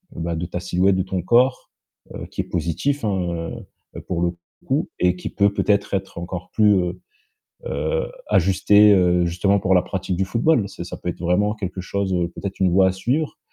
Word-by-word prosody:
bah, 85 0 -3
de 85 +2 -3
ta 90 0 -4
silhouette 90 +2 +1
de 95 - 0
ton 95 -2 -3
corps, 125 +7 +2 0.4
heu, - - -6
qui - - -2
est - - -6
positif, 90 - -2
hein, 85 -4 -2 0.4
heu, - - -6
pour 85 -2 -2
le 85 0 0 0.3
coup - - 0
et 90 0 +3
qui - - -5
peut 100 0 +2
peut-être 100 0 +1
être 95 -2 -5
encore 90 +1 -6
plus, 105 -2 +4
heu, 90 -2 -1 0.7
heu, - - -1 0.2
ajusté, 100 +3 +5
heu, 90 -2 +3
justement 95 +4 +1
pour 95 0 +2
la 90 - +4
pratique 95 -1 -3
du 95 - +1
football. 115 +1 +1
C'est 95 - -8
ça - - -7
peut - - -6
être - - -11
vraiment 95 +5 +1
quelque 95 -3 -5
chose, 95 +1 -2
heu, 85 -1 0
peut-être 95 +2 -7
une 95 -2 +3
voie 95 +1 +4
à - - 0
suivre 135 +11 -2
95 Hz, 205 wpm, -22 LUFS, 90-100 Hz, 0.7 s, ajusté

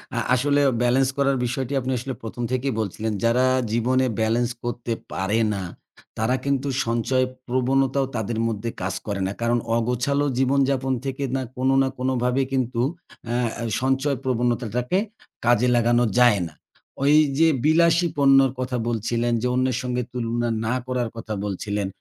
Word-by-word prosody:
আ - - -2 0.2
আসলে 145 +3 +2 0.2
ব্যালেন্স 130 +2 +3
করার 140 -1 +2
বিষয়টি 130 +2 -3
আপনি 130 +1 -3
আসলে 130 +2 -4
১ম 120 +2 -5
থেকেই 130 0 0
বলছিলেন। 110 +1 -2
যারা 120 +2 +3 0.3
জীবনে 130 +3 +2
ব্যালেন্স 115 +2 +1
করতে 120 -1 -3 0.2
পারে 100 +4 0
না, 95 -2 -3 0.5
তারা 110 +4 +1
কিন্তু 140 0 0 0.2
সঞ্চয় 120 +3 +1 0.2
প্রবণতাও 130 +2 +1
তাদের 110 0 -2
মধ্যে 115 0 -3
কাজ 95 0 -2
করে 100 -2 -2
না। - - -2
কারণ 120 +1 +2 0.2
অগোছালো 125 +5 0
জীবনযাপন 135 0 +2
থেকে 135 +1 -3
না 135 - 0 0.2
কোনো 130 +1 +2
না 135 - +2
কোনোভাবে 125 0 +1
কিন্তু 125 -2 0 0.5
অ্যা 120 +1 0 0.4
সঞ্চয় 135 +1 +1
প্রবণতাটাকে 125 - 0 0.5
কাজে 120 +1 +4
লাগানো 120 +1 +3 0.2
যায় 120 -5 +5
না। 80 - -14 0.5
ওইযে 150 +1 +4 0.2
বিলাসী 170 +2 +4
পণ্যের 135 -1 +5
কথা 125 -1 -2
বলছিলেন, 120 +1 0
যে 125 - 0
অন্যের 130 -1 +1
সঙ্গে 125 0 -2
তুলনা 120 -1 -1 0.2
না 115 - 0
করার 125 -2 -1
কথা 110 -1 -5
বলছিলেন। 100 0 -2
125 Hz, 145 wpm, -23 LUFS, 115-135 Hz, 0.5 s, যায়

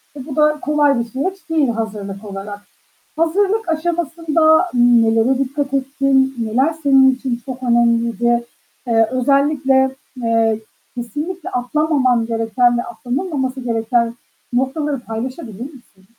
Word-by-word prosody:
ve 270 -2 -8
bu 285 - -7
da 300 0 +3
kolay 290 -3 +2
bir 235 - -1
süreç 325 - -5
değil 305 -6 +2
hazırlık 210 -3 -5
olarak. 200 +1 -7 0.6
Hazırlık 395 +6 +1
aşamasında 325 0 +2
nelere 240 +1 +4
dikkat 275 +1 -2
ettin? 270 0 +1
Neler 255 +8 +1
senin 265 -2 +5
için 255 -2 -4
çok 260 0 -7
önemliydi? 235 0 +2 0.4
Eee, 225 -2 +3
özellikle, 270 0 +2 0.3
eee, 225 -2 +1 0.3
kesinlikle 300 - -5
atlamaman 255 -2 +1
gereken 235 +1 +1
ve - - 0
atlanılmaması 260 +2 -3
gereken 235 0 0 0.4
noktaları 270 +2 -1
paylaşabilir 230 - -6
misin? 245 -8 -11
260 Hz, 115 wpm, -18 LUFS, 235-295 Hz, 0.6 s, senin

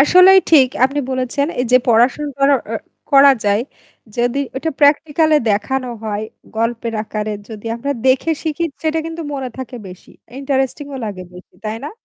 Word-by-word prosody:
আসলেই 365 +6 +7
ঠিক 280 -6 +6 0.2
আপনি 275 +2 0
বলেছেন 260 +2 -1
এইযে 250 0 +4
পড়াশোনা 245 +6 +3
করা 275 +1 +4 0.2
আ - - -1 0.4
করা 275 0 +8
যায় 205 +2 +2 0.5
যদি 245 +2 0 0.2
ওটা 320 +4 -2
প্র্যাকটিক্যালই 300 +1 +3
দেখানো 255 +5 -1 0.2
হয়, 210 0 -3 0.3
গল্পের 230 0 -2
আকারে 215 0 -4 0.2
যদি 220 0 -9
আমরা 280 +4 -2
দেখে 260 +5 +3
শিখি 320 +1 -2 0.2
সেটা 320 0 0
কিন্তু 330 0 -6
মনে 265 -2 -4
থাকে 260 -1 -7
বেশি, 180 0 -14 0.3
ইন্টারেস্টিংও 275 +1 -2
লাগে, 200 -4 -5 0.4
তাই 215 +1 -3
না? 295 - -5
265 Hz, 150 wpm, -18 LUFS, 230-290 Hz, 0.5 s, করা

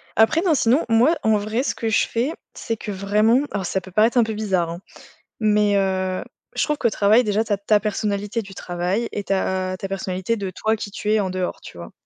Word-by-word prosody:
Après 225 +9 +4
non 355 -3 +2
sinon, 260 +4 +2
moi 245 +9 +4
en 220 -1 +3
vrai, 215 +5 -1
ce - - -2
que 225 - -2
je 220 - +2
fais, 240 +6 -1 0.2
c'est 225 - -4
que 210 - -6
vraiment 210 +5 +2
alors, 200 -2 -2
ça 190 - -1
peut 190 - -13
paraître 220 +6 +3
un 240 - +6
peu 220 - -3
bizarre, 190 -6 0
hein. 170 +1 -6 0.6
Mais, 210 -2 +3
heu, 190 -1 0 0.3
je - - +1
trouve 300 -1 0
qu'au 235 - +2
travail 215 +3 +4
déjà, 210 0 +1
tu 220 - -8
as - - +1
ta 205 +1 +2
personnalité 210 +1 -2
du 195 -2 -11
travail 180 +7 -2
et 205 - -4
tu 195 - -1
as 185 -1 -1
ta 195 - -5
personnalité 190 +2 -2
de 195 -2 -4
toi, 220 +4 0
qui 210 -2 -7
tu 210 +1 -2
es 220 - +3
en 195 -2 -1
dehors, 185 -1 -3
tu - - -12
vois? 85 0 -9
210 Hz, 240 wpm, -22 LUFS, 190-225 Hz, 0.6 s, un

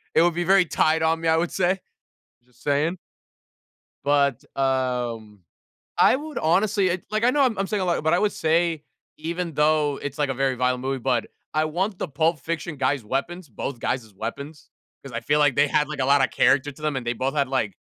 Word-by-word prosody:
it - - +6
would 175 - +3
be 175 +1 -1
very 190 +1 +4
tight 160 0 +2
on 160 0 +1
me, 165 - -1
I 160 - +4
would 170 +1 0
say. 185 +1 +1 0.7
Just 125 - -25
saying. 150 +5 0 1.1
But, 140 -1 +2
um, 125 -6 -1 0.6
I - - +6
would 305 +2 -6
honestly 195 +4 +2
ed 180 0 -2
like, 215 +2 0
I 250 - +5
know 285 +1 +2
I'm 245 -5 +2
I'm 195 - 0
saying 210 -1 -2
a - - 0
lot, 175 -3 0
but 160 +2 +2
I 175 - +3
would 210 -1 +1
say, 165 -1 0 0.3
even 170 +2 -3
though 150 -1 +2
it's, 145 -1 -5
like, 145 -2 +1
a - - -1
very 135 0 0
violent 125 0 0
movie, 135 0 -2
but 125 -2 0 0.3
I 155 0 +2
want 185 +5 -2
the - - -3
Pulp 160 +3 +1
Fiction 165 +2 -4
guys' 135 -3 0
weapons- 155 - -3
both 125 +3 -5
guys' 115 -5 -3
weapons- 140 +9 -7 0.3
'cause 135 - -9
I 115 - -3
feel 145 +4 +1
like 145 -4 +3
they 145 0 +4
had, 150 +1 +1
like, 150 -2 -6
a 130 - +1
lotta 140 -1 +4
character 140 +1 +2
to 150 - -16
them, 150 -2 -1
and 125 -2 -4
they 120 - +1
both 130 +4 -2
had, 140 -3 +1
like 120 -7 -1
150 Hz, 220 wpm, -24 LUFS, 135-175 Hz, 1.1 s, it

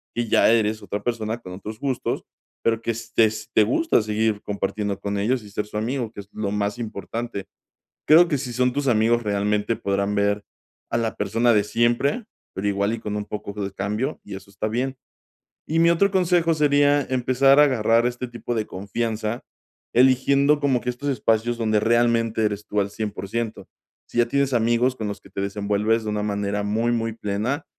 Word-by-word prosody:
que 120 0 -1
ya 110 - +4
eres 110 -1 +1
otra 100 +1 -4
persona 115 -1 -2
con 90 -6 -10
otros 105 +4 -8
gustos, 135 -3 -2 0.4
pero 115 -1 +2
que 115 - -1
estés 110 -1 0
te 110 - +5
gusta 125 - +2
seguir 105 0 0
compartiendo 100 0 -2
con 100 0 -3
ellos 120 +4 0
y 105 - -12
ser 105 +1 -3
su 105 - -7
amigo, 115 +1 -2
que - - -11
es 100 - -18
lo 105 -2 -3
más 105 +1 -1
importante. 115 -1 -5 0.6
Creo 165 +3 +7
que 145 - +1
si 125 -2 -5
son 125 +1 +2
tus 145 -1 -1
amigos 115 0 +3
realmente 105 +2 0
podrán 100 -1 -1
ver 100 0 +1 0.5
a - - 0
la 115 -1 -1
persona 115 +4 +2
de 105 -1 +3
siempre, 120 - +1 0.3
pero 95 +2 -2
igual 100 +2 0
y 115 - -3
con 105 -1 -4
un 105 0 -3
poco 105 -1 -6
de 100 - -4
cambio, 105 +9 -2
y - - -8
eso 100 - -11
está 100 +2 -3
bien. 130 +4 -2 0.7
Y 160 +2 +1
mi 170 0 +5
otro 200 +4 +3
consejo 175 -3 +3
sería 145 -1 +3
empezar 130 +2 +4
a - - +9
agarrar 115 -3 +2
este 125 +1 -4
tipo 120 0 -5
de 110 -1 -1
confianza 110 +3 -3 0.5
eligiendo 140 +3 +4
como 140 -3 +2
que 125 - -3
estos 140 +4 -4
espacios 115 -1 +1
donde 110 -2 +1
realmente 115 0 +2
eres 105 0 -2
tú 105 - 0
al 100 0 -3
100% 110 +1 -4 0.4
Si - - -2
ya 120 - +4
tienes 140 +2 +1
amigos 120 +2 +2
con 110 -4 -4
los 100 - -5
que - - -17
te 100 - -4
desenvuelves 105 +3 0
de 110 - -3
una 105 0 -1
manera 100 0 -1
muy, 110 +3 0
muy 115 -1 -1
plena, 110 +7 -2
115 Hz, 195 wpm, -23 LUFS, 105-125 Hz, 0.7 s, a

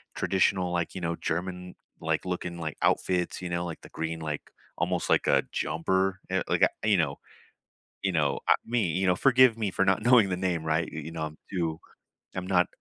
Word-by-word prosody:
traditional, 95 -1 +1
like, 85 -1 -2
you - - -3
know, 85 0 -1
German, 90 +2 -4 0.3
like, - - -1
looking, 90 -1 -3
like, 80 -2 -4
outfits, 90 -1 +1
you 90 - -4
know, 85 0 -1
like, 85 -2 -6
the - - -13
green, 80 0 -4
like, 75 -2 -5 0.3
almost - - -1
like - - +3
a - - +4
jumper, 95 +4 0
y - - 0
like - - +1
a - - +7 0.2
you 105 - +5
know 75 -5 0 0.8
you 95 - +1
know, 75 -4 +1
uh - - +7
me 115 -6 +1
you 95 +3 0
know, 90 - +3
forgive 125 -2 +5
me 105 -3 0
for 95 - +2
not 95 +2 +2
knowing 120 -3 +6
the 90 - 0
name, 90 -3 -1
right? 80 +1 0
You 80 - -5
you 80 +2 -7
know, 80 -1 -4
I'm 80 0 -6
too 85 -4 -2 0.5
I'm 90 0 -4
not 90 -2 +3
90 Hz, 210 wpm, -28 LUFS, 80-95 Hz, 0.8 s, a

